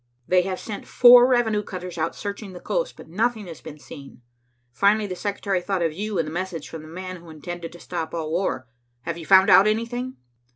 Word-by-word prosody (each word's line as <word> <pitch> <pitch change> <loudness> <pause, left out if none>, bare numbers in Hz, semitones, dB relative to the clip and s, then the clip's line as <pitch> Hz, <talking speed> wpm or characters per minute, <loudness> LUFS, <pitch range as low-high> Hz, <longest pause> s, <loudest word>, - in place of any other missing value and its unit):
They 185 0 +4
have 185 0 -3
sent 210 -3 -7
four 245 0 +8
revenue 235 -4 +2
cutters 180 -3 -7
out 160 +1 -1
searching 200 -1 -6
the 180 - -9
coast, - - -2
but - - -12
nothing 220 +5 -1
has 170 -3 -10
been 150 - -10
seen. 140 -4 -12 0.5
Finally 205 - +3
the 185 -2 -5
secretary 200 -1 -2
thought 190 -1 -1
of 165 -2 0
you 205 +3 -3
and 165 -2 0
the - - -5
message 175 -3 -4
from 160 - -8
the 155 - -12
man 185 +3 -7
who 170 -1 -14
intended 165 +2 -7
to 175 - -12
stop 170 -3 -5
all 160 -2 -4
war. 170 -6 -1 0.4
Have 170 +3 -5
you 165 - -9
found 190 0 +7
out 195 - +8
anything?" 240 +4 -2
185 Hz, 215 wpm, -24 LUFS, 165-210 Hz, 0.5 s, four